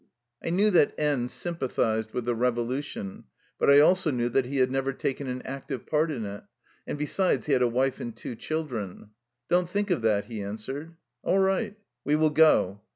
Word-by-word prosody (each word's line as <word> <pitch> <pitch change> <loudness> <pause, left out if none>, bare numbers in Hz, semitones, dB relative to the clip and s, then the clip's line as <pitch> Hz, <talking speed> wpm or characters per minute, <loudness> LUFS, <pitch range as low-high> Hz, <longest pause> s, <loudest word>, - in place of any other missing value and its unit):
I - - -2
knew 200 +5 +3
that 170 -6 +4
N 145 -5 +1
sympathized 125 -9 -2
with 125 - -3
the 120 - +1
revolution, 120 -2 -2 0.3
but - - +3
I 140 0 +8
also 180 +2 +4
knew 120 -3 0
that 125 +1 +1
he 140 +2 -3
had 130 -1 +3
never 135 0 0
taken 135 +1 -3
an 125 0 -4
active 135 -2 -6
part 155 +1 +1
in 125 -8 -3
it, 100 0 -7 0.4
and - - -3
besides 175 +6 +1
he 150 - +1
had 130 - +3
a 125 - +4
wife 130 +3 0
and 115 -1 -6
two 120 - -6
children. 115 - -4 0.2
" 120 0 -57
Don't 175 0 +3
think 205 +1 -1
of 170 - +1
that/' 105 -2 +2
he 110 -2 -6
answered. 135 +11 -6 0.3
"All 190 - +1
right, 195 +2 +1 0.3
we 150 - +2
will 155 0 +3
go." 145 -11 +4
135 Hz, 200 wpm, -27 LUFS, 120-155 Hz, 0.4 s, I